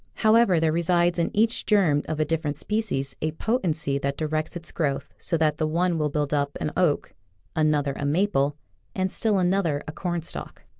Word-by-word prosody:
However, 215 -5 +4
there 160 -1 +2
resides 170 +1 +2
in 170 - +1
each 225 +3 +1
germ 175 -9 +3
of 155 - -3
a 155 - +2
different 150 -2 -2
species 180 -12 -2
a 155 0 -1
potency 160 - 0
that 140 0 -2
directs 155 +2 -2
its 170 0 -5
growth 145 -5 -2
so 170 - 0
that 155 -1 +1
the 155 - +1
one 170 +1 +1
will 150 -1 +1
build 145 0 -1
up 140 -1 0
an 150 - -2
oak, 170 -6 +1 0.4
another 150 -3 +2
a - - -5
maple, 145 -2 +1 0.4
and 185 -1 0
still 215 -3 +1
another 180 -5 +1
a - - -4
cornstalk. 175 0 -5
160 Hz, 185 wpm, -25 LUFS, 150-180 Hz, 0.4 s, However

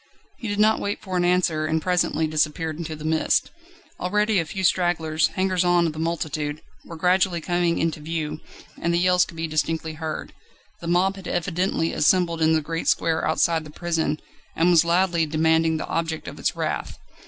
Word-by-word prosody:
He 230 - -5
did 205 0 -2
not 215 +1 +4
wait 205 +1 -3
for 185 -2 -6
an 180 - +2
answer, 175 -3 +1
and 160 +1 +1
presently 175 -2 +1
disappeared 155 +1 -1
in 160 -2 -5
the 155 - -8
mist. 160 0 +1 0.5
Already 210 +2 +1
a 165 - -1
few 190 +4 -5
stragglers, 160 -4 +2
hangers 185 -1 +1
on 175 -1 +3
of 160 - -1
the 155 - -8
multitude, 155 -2 -3 0.2
were 165 - -9
gradually 180 +1 +2
coming 175 0 0
into 165 -1 -1
view, 155 0 -4 0.4
and 170 - +1
the 170 - +2
yells 180 0 +4
could 165 - -13
be 165 - -2
distinctly 160 0 -1
heard. 155 0 -5 0.5
The 170 - -7
mob 185 +3 +2
had 190 - -9
evidently 175 -1 -1
assembled 170 0 +2
in 160 0 +4
the 160 - +2
great 165 +2 -4
square 160 -1 +1
outside 160 0 +2
the 155 - -11
prison, 160 -2 -1 0.4
and 170 +2 +3
was 170 -2 +6
loudly 170 -1 +2
demanding 160 +1 +2
the - - -4
object 165 -1 -3
of - - -8
its - - 0
wrath. - - -3
165 Hz, 190 wpm, -24 LUFS, 160-180 Hz, 0.5 s, was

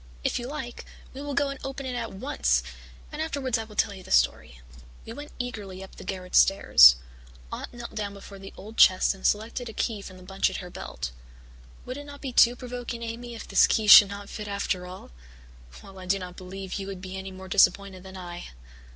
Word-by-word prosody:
If - - 0
you 240 - -5
like, 265 -4 -6 0.3
we 270 - -7
will 285 -1 -4
go 280 0 +2
and 275 -1 -6
open 270 0 -5
it 255 - -3
at 235 -2 -4
once 260 +10 0 0.5
and 300 0 -5
afterwards 270 -6 -1
I 225 - -4
will 215 -1 -14
tell 205 0 +1
you 190 - -10
the - - -14
story." - - +2 0.5
We 225 - -7
went 290 +4 -9
eagerly 205 -7 -6
up 190 - -13
the - - -9
garret 185 -2 -6
stairs. 60 - +8 0.6
Aunt - - -6
knelt 240 -1 -9
down 205 -2 -4
before 200 0 -11
the 195 0 -10
old 220 +3 -11
chest 185 +1 +6
and 195 - -15
selected 225 +3 -1
a - - -9
key 215 -3 -2
from 185 -1 -10
the 185 - -14
bunch 195 +1 0
at 190 - -5
her 180 -1 -8
belt. - - -6 0.7
"Would 255 - -6
it 290 - -8
not 285 0 -10
be 265 -3 -6
too 240 0 +6
provoking, 245 -1 -6
Amy, 235 +1 -6
if 225 - -9
this - - +5
key 220 - +1
should 205 -1 +10
not 200 0 -7
fit 210 0 -7
after 200 -2 -2
all? 185 - -11 0.7
Well, 195 -1 -12
I 185 - -9
do 195 +2 +2
not 180 -2 -8
believe 190 +1 -6
you 195 - -5
would 195 -2 -6
be 185 0 -7
any 190 0 -6
more 190 0 -10
disappointed 195 0 +3
than 190 0 -10
I." 175 -1 -8
200 Hz, 225 wpm, -26 LUFS, 190-245 Hz, 0.7 s, should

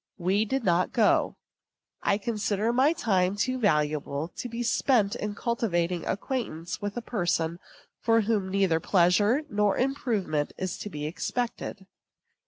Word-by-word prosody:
We 195 +4 +1
did 265 +4 -1
not 180 -2 +2
go. 220 -3 +3 0.7
I 200 - +2
consider 215 0 -1
my 265 +5 +4
time 195 - +1
too 255 +5 -1
valuable 150 - 0
to 245 - -7
be 235 +1 -3
spent 230 -3 +2
in 210 0 -4
cultivating 180 -8 -1
acquaintance 190 -7 -3
with 205 +2 -4
a 240 - -3
person 170 -6 -1 0.4
from 225 -1 +3
whom 205 -3 0
neither 190 -4 +2
pleasure 205 - +3
nor 210 -3 +1
improvement 225 - -1
is 185 -1 -3
to 210 - -5
be 150 -5 -5
expected. 195 +4 -3
205 Hz, 140 wpm, -27 LUFS, 175-230 Hz, 0.7 s, my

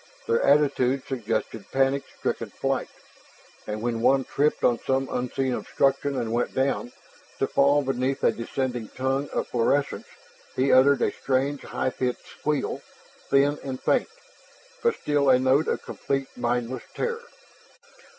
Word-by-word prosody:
Their 115 - +2
attitude 140 -2 +3
suggested 115 -3 -3
panic 135 +1 +2 0.2
stricken - - -2
flight, - - -2 0.8
and 105 +1 -4
when 115 -1 -1
one 135 +2 +4
tripped 145 +4 0
on 120 -2 +3
some 135 0 0
unseen 125 +1 -1
obstruction 135 +2 0
and 115 -2 -2
went 120 +1 -1
down 130 -2 0 0.5
to - - +1
fall 140 +1 +3
beneath 130 0 -1
a - - +5
descending 120 0 -3
tongue 135 +2 -1
of - - -3
phosphorescence 140 +4 0 0.5
he 135 +1 +2
uttered 135 +1 +5
a - - +2
strange 135 +2 -1
high 130 - -2
pitched 125 -1 -3
squeal, 150 -1 -2 0.5
thin 140 +2 +3
and 130 -2 -4
faint, - - +1 0.7
but 465 -1 +2
still 145 -2 +1
a 130 - +7
note 130 +4 +3
of - - -1
complete, 135 -1 -3
mindless 120 +1 -1
terror. 470 -1 -2
135 Hz, 140 wpm, -26 LUFS, 125-140 Hz, 0.8 s, a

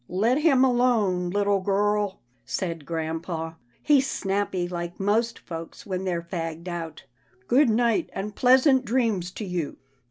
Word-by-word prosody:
" - - -42 0.2
Let 255 +5 +3
him 275 -5 +4
alone, 225 -8 +2
little 200 +1 +1
girl," 205 +1 0 0.2
said 165 +2 -4
grampa, 165 0 -4
" 120 - -37
he's 280 -3 +4
snappy 195 -2 -1
like 175 -1 -5
most 225 +4 +1
folks 165 +7 -8
when 190 -2 -3
they're 175 -2 -1
fagged 165 0 -5
out. 170 -4 -6 0.4
Good 270 +1 +4
night, 235 +8 +2
and 200 +1 -5
pleasant 260 +1 +5
dreams 225 -7 0
to 215 - -5
you." 175 -5 -3
195 Hz, 150 wpm, -25 LUFS, 170-235 Hz, 0.4 s, pleasant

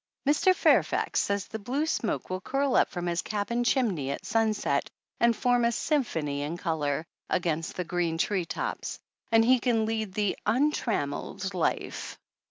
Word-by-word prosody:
Mr. 335 +6 +4
Fairfax - - +3
says 200 -1 0
the 220 - -6
blue 260 +8 -1
smoke 230 -11 -2
will 185 0 -2
curl 275 +4 0
up - - +4
from 175 -1 -4
his 175 0 0
cabin 220 +3 -1
chimney 215 - +1
at - - -4
sunset 215 -10 +1 0.3
and 235 0 +4
form 245 +2 +2
a 235 - +3
"symphony 165 - -1
in 150 +4 -3
color" 160 -3 -1 0.2
against 165 -2 -1
the 180 - -2
green 175 -1 -1
tree 185 +1 0
tops; - - -4 0.3
and 225 0 +5
he 255 +1 +5
can 230 -3 +1
lead 220 -3 -2
the 205 -2 +1
"untrammeled 215 - 0
life." 180 - -2
210 Hz, 160 wpm, -28 LUFS, 170-240 Hz, 0.3 s, and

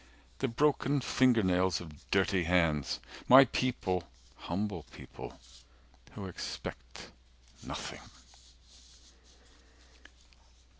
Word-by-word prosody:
The 135 - +1
broken 145 +2 +2
finger 125 -2 +3
nails 90 -1 +2
of 80 -4 -13
dirty 95 -2 +2
hands. 80 -5 +1 0.3
My 135 +2 +10
people 95 -9 -1 0.3
humble 95 +2 -3
people - - -10 0.8
who 100 - -6
expect 90 - -7 0.5
Nothing." - - -6
95 Hz, 80 wpm, -31 LUFS, 90-125 Hz, 0.8 s, My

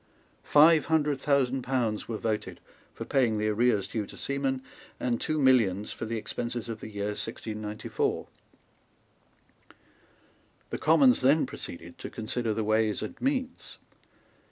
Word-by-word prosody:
Five 155 +1 +6
hundred 150 -4 +1
thousand 135 -2 +2
pounds 120 -4 -1
were 115 - -3
voted 110 -1 -3 0.3
for - - -7
paying 120 -5 +2
the 105 0 0
arrears 105 -2 +2
due 105 -3 -3
to - - -12
seamen, 135 -1 -2 0.4
and 120 -2 -1
two 155 -1 -1
millions 115 -8 +3
for - - -5
the 115 +1 -3
expenses 120 +1 -4
of 115 -2 -5
the - - -8
year 100 -1 -3
1694. 105 0 -3 2.4
The - - -2
Commons 145 -6 +5
then 140 +5 +4
proceeded - - -9
to - - -6
consider 115 +1 -3
the 110 +1 -1
Ways 110 0 +1
and - - -5
Means. 260 -1 -2
120 Hz, 135 wpm, -28 LUFS, 110-140 Hz, 2.4 s, Five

